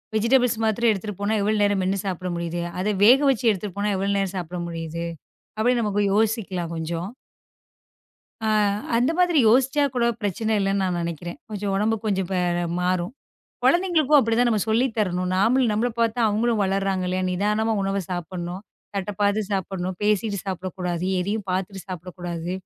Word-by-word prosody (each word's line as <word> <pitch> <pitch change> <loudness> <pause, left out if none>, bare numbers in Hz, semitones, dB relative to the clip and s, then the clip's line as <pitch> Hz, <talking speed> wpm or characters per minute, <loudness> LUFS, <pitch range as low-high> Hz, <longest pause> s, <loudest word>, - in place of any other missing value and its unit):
Vegetables 235 +2 +3
மாத்திரம் 225 +2 +2
எடுத்துட்டு 210 -1 -4
போனா 205 +2 +1
எவ்வளவு 210 +1 +1
நேரம் 205 -1 +2
மென்னு 190 +2 0
சாப்பிட 185 -1 -3
முடியுது. 170 0 -3 0.2
அத 185 - -1 0.2
வேக 250 +5 +8
வச்சு 255 -3 0
எடுத்துட்டு 200 -1 -5
போனா, 205 +1 0
எவ்வளவு 200 +1 0
நேரம் 195 -1 -1
சாப்பிட 175 0 -5
முடியுது 165 0 -5 0.5
அப்டினு 245 +2 +3
நமக்கு 205 -1 0
யோசிக்கலாம் 205 -6 0
கொஞ்சம். 165 +2 -3 1.4
அ - - +1 0.5
அந்த 245 +6 +3
மாதிரி 355 -2 +3
யோசிச்சா 265 +5 +3
கூடப் 235 -2 +1
பிரச்சன 215 +2 0
இல்லன்னு 195 0 +1
நான் 180 -2 0
நெனைக்கிறேன். 170 +1 -5
கொஞ்சம் 205 -1 -3
உடம்பு 215 +3 +1
கொஞ்சம் 190 -3 0 0.5
மாறும். 180 +3 0 0.5
கொழந்தைகளுக்கும் 340 -5 +4
அப்டி 230 -4 +2
தான் 245 0 +4
நம்ம 220 -3 +1
சொல்லித் 230 +2 +2
தரணும். 180 -3 0
நாமள் 240 +7 +3
நம்மள 220 +4 +1
பாத்து 230 0 +1
அவங்களும் 220 +1 +1
வளர்றாங்களே. 190 -1 0
நிதானமா 210 +4 +1
உணவைச் 195 -2 -2
சாப்பிடணும். 175 +1 -5 0.3
தட்டப் 200 +1 -4
பாத்து 205 +1 +2
சாப்பிடணும். 185 -1 -2
பேசிட்டு 210 0 +1
சாப்பிடக் 185 -1 -4
கூடாது. 180 -1 -2 0.2
எதயும் 200 +2 -2
பாத்துட்டு 190 +1 -3
சாப்பிடக் 180 -1 -7
கூடாது. 175 0 -4
200 Hz, 155 wpm, -24 LUFS, 180-220 Hz, 1.4 s, வேக